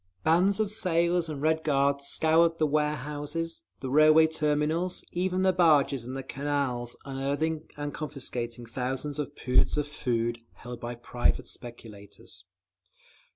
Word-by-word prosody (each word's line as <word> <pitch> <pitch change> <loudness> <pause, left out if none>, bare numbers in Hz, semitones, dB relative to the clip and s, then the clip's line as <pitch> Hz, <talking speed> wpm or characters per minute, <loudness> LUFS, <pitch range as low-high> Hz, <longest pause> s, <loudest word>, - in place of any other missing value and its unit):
Bands 180 +6 +3
of 215 -2 +1
sailors 170 -4 +1
and 145 -2 -5
Red 160 0 +2
Guards 140 -1 +1
scoured 165 +2 +3
the 155 - +2
warehouses, 150 +2 -2 0.2
the 130 - -4
railway 155 +2 +7
terminals, 160 +3 0
even 185 +1 0
the 190 0 +4
barges 150 -8 +3
in 130 +2 -6
the 135 - -4
canals, 135 -3 -2
unearthing 145 +4 -2
and 145 -1 -4
confiscating 120 -5 -5
thousands 130 +5 -3
of 145 0 -4
poods 125 +3 +2
of 150 -1 0
food 120 -4 -1 0.2
held 120 0 -9
by 120 +1 -5
private 120 +1 0
speculators. 100 -7 -11
145 Hz, 135 wpm, -28 LUFS, 125-160 Hz, 0.2 s, railway